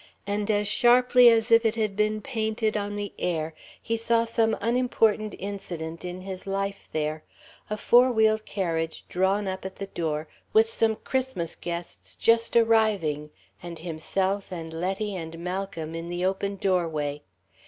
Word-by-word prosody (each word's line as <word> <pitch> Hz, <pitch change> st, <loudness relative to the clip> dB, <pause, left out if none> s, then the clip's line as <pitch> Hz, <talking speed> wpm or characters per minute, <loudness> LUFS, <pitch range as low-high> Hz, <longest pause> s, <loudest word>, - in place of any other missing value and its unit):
And 205 Hz, +1 st, -2 dB
as 205 Hz, -1 st, +2 dB
sharply 245 Hz, +2 st, +6 dB
as 225 Hz, -1 st, +2 dB
if 230 Hz, 0 st, +7 dB
it 225 Hz, 0 st, +2 dB
had 215 Hz, -3 st, -1 dB
been 215 Hz, +1 st, +1 dB
painted 220 Hz, -3 st, -1 dB
on 205 Hz, 0 st, -2 dB
the 205 Hz, -1 st, -4 dB
air, 160 Hz, -2 st, -1 dB, 0.3 s
he 230 Hz, -, -2 dB
saw 230 Hz, 0 st, +2 dB
some 225 Hz, -1 st, +1 dB
unimportant 225 Hz, -2 st, +1 dB
incident 175 Hz, -5 st, -6 dB
in 180 Hz, +1 st, -5 dB
his 190 Hz, 0 st, -7 dB
life 195 Hz, 0 st, -3 dB
there 155 Hz, 0 st, -2 dB, 0.5 s
a 210 Hz, -, -2 dB
four 245 Hz, +4 st, +5 dB
wheel 220 Hz, -1 st, +3 dB
carriage 165 Hz, -6 st, -3 dB
drawn 195 Hz, +3 st, +1 dB
up 190 Hz, 0 st, -4 dB
at 190 Hz, 0 st, -6 dB
the 200 Hz, -, -5 dB
door 155 Hz, -4 st, -3 dB, 0.3 s
with 220 Hz, +1 st, +6 dB
some 225 Hz, 0 st, +1 dB
Christmas 260 Hz, -10 st, -3 dB
guests 170 Hz, 0 st, -6 dB
just 230 Hz, 0 st, +2 dB
arriving, 215 Hz, -10 st, +3 dB, 0.3 s
and 175 Hz, -1 st, -7 dB
himself 185 Hz, +5 st, -2 dB
and 165 Hz, -2 st, -6 dB
Letty 190 Hz, +5 st, -2 dB
and 165 Hz, -2 st, -6 dB
Malcolm 180 Hz, -2 st, -4 dB
in 165 Hz, +1 st, -5 dB
the 175 Hz, +1 st, -2 dB
open 195 Hz, +1 st, -1 dB
doorway. 160 Hz, -7 st, -1 dB
195 Hz, 155 wpm, -26 LUFS, 170-220 Hz, 0.5 s, if